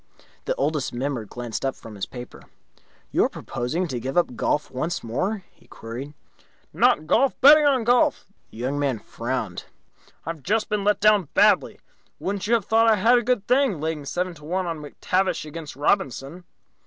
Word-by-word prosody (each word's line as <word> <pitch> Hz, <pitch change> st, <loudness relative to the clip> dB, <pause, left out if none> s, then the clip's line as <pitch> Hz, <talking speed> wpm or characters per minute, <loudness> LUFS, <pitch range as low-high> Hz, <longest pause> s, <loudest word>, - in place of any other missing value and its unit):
The -, -, -1 dB
Oldest 155 Hz, -, -1 dB
Member 125 Hz, -2 st, -3 dB
glanced 120 Hz, +2 st, -6 dB
up 135 Hz, -1 st, -1 dB
from 110 Hz, -, -12 dB
his 100 Hz, -2 st, -5 dB
paper. 125 Hz, -1 st, -10 dB, 0.7 s
"You -, -, +3 dB
are -, -, 0 dB
proposing 160 Hz, +10 st, -3 dB
to 125 Hz, -3 st, -3 dB
give 130 Hz, +7 st, -4 dB
up 170 Hz, -8 st, +2 dB
golf 150 Hz, -, -1 dB
once 155 Hz, +7 st, -3 dB
more?" 185 Hz, -, -2 dB
he -, -, -26 dB
queried. 130 Hz, +6 st, -8 dB, 0.6 s
"Not 155 Hz, -, +3 dB
golf. 260 Hz, -, +2 dB
Betting 295 Hz, +2 st, +8 dB
on 265 Hz, -4 st, +2 dB
golf." 245 Hz, +2 st, +2 dB, 0.2 s
The -, -, -15 dB
Young 130 Hz, +4 st, -2 dB
Man 140 Hz, -4 st, 0 dB
frowned. 115 Hz, -4 st, -4 dB, 0.6 s
"I've 165 Hz, -1 st, -5 dB
just 215 Hz, +7 st, 0 dB
been 210 Hz, -2 st, -1 dB
let 210 Hz, +1 st, +2 dB
down 210 Hz, -5 st, +4 dB
badly. 210 Hz, +1 st, +3 dB, 0.4 s
Wouldn't 200 Hz, +1 st, -3 dB
you 235 Hz, -, +4 dB
have 220 Hz, -5 st, -1 dB
thought 225 Hz, +1 st, +4 dB
I 220 Hz, -, +5 dB
had 230 Hz, +5 st, +4 dB
a -, -, -2 dB
good 240 Hz, -3 st, 0 dB
thing, 250 Hz, -, +2 dB
laying 155 Hz, -1 st, -3 dB
seven 180 Hz, +4 st, -2 dB
to 150 Hz, -3 st, -16 dB
one 180 Hz, +4 st, -2 dB
on 165 Hz, -2 st, -4 dB
McTavish 180 Hz, +5 st, -1 dB
against 155 Hz, 0 st, -8 dB
Robinson?" 145 Hz, -, -1 dB
165 Hz, 180 wpm, -24 LUFS, 135-210 Hz, 0.7 s, Betting